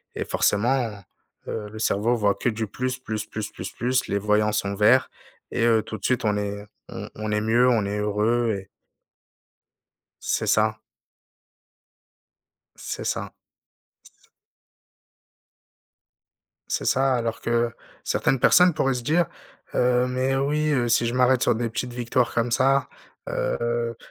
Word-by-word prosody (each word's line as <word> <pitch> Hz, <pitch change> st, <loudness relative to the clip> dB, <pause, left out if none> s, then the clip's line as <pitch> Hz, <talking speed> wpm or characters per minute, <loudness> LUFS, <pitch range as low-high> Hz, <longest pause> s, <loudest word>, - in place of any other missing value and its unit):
et -, -, -2 dB
forcément, 120 Hz, +4 st, +1 dB, 0.6 s
heu, 105 Hz, -2 st, -4 dB
le 110 Hz, -, -9 dB
cerveau 110 Hz, +2 st, +1 dB
voit 105 Hz, -3 st, +2 dB
que -, -, -3 dB
du 110 Hz, 0 st, -2 dB
plus, 130 Hz, +5 st, -3 dB
plus, 110 Hz, -4 st, -4 dB
plus, 110 Hz, -1 st, -6 dB
plus, 95 Hz, 0 st, -7 dB
plus, 125 Hz, +1 st, 0 dB
les 100 Hz, -, 0 dB
voyants 105 Hz, +1 st, +2 dB
sont 100 Hz, -1 st, -1 dB
verts 110 Hz, +6 st, +4 dB, 0.4 s
et -, -, 0 dB
heu, 115 Hz, -2 st, +4 dB
tout 110 Hz, -, -6 dB
de -, -, -21 dB
suite 125 Hz, -2 st, +1 dB
on 105 Hz, -1 st, +1 dB
est 100 Hz, 0 st, -4 dB, 0.2 s
on -, -, -7 dB
on 110 Hz, 0 st, -4 dB
est 105 Hz, -, +1 dB
mieux, 115 Hz, +3 st, +3 dB
on 110 Hz, -5 st, +2 dB
est 100 Hz, +1 st, -2 dB
heureux 110 Hz, +3 st, +1 dB
et 95 Hz, -, -10 dB, 1.6 s
C'est -, -, -1 dB
ça. 110 Hz, 0 st, +2 dB, 2.0 s
C'est -, -, -6 dB
ça. -, -, -3 dB, 0.9 s
S -, -, -28 dB, 2.4 s
C'est -, -, -2 dB
ça, 135 Hz, 0 st, +2 dB
alors 115 Hz, -2 st, -2 dB
que 120 Hz, 0 st, 0 dB, 0.3 s
certaines 135 Hz, -, +1 dB
personnes 180 Hz, +6 st, +5 dB
pourraient 135 Hz, -3 st, +1 dB
se 125 Hz, -, -4 dB
dire, 160 Hz, +7 st, +2 dB, 0.5 s
heu: 125 Hz, 0 st, +3 dB
«Mais 130 Hz, +1 st, 0 dB
oui, 150 Hz, +3 st, +1 dB
heu, 120 Hz, -3 st, +1 dB
si 120 Hz, 0 st, +3 dB
je 120 Hz, -, -2 dB
m'arrête 125 Hz, 0 st, +3 dB
sur 120 Hz, -, +3 dB
des 115 Hz, +1 st, -1 dB
petites 120 Hz, +2 st, -4 dB
victoires 120 Hz, 0 st, 0 dB
comme 120 Hz, +1 st, 0 dB
ça, 135 Hz, +1 st, +3 dB, 0.4 s
heu, 120 Hz, -1 st, -1 dB
120 Hz, 150 wpm, -24 LUFS, 110-125 Hz, 2.4 s, personnes